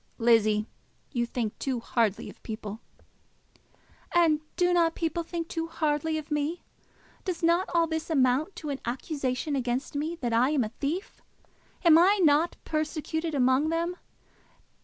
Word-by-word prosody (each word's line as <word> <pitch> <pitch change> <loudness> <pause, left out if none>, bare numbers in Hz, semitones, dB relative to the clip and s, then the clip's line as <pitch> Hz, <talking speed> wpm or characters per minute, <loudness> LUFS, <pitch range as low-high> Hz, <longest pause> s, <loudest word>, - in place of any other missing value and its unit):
"Lizzie, 215 -2 +3 0.5
you 240 -3 -1
think 230 -3 -3
too 260 -3 -1
hardly 230 -3 0
of - - -12
people." 215 -1 -6 1.4
"And 320 -3 +4
do 355 0 +2
not 335 -2 +3
people 335 +1 -1
think 335 0 -4
too 330 -1 -3
hardly 315 -1 0
of 310 -1 -7
me? 300 +3 -1 0.6
Does 360 -3 -4
not 340 +3 +3
all 335 -1 +3
this 320 0 -3
amount 280 +4 +2
to 300 - -5
an 275 - -4
accusation 265 +2 -2
against 255 0 -2
me 305 +4 -2
that 240 -8 -3
I 240 +4 +4
am 290 -4 +2
a 215 - -3
thief? 300 - -4 0.6
Am 325 -1 +8
I 390 +4 +5
not 310 +2 +4
persecuted 310 +1 -2
among 260 +3 +3
them? 335 +2 -1
305 Hz, 150 wpm, -28 LUFS, 255-330 Hz, 1.4 s, Am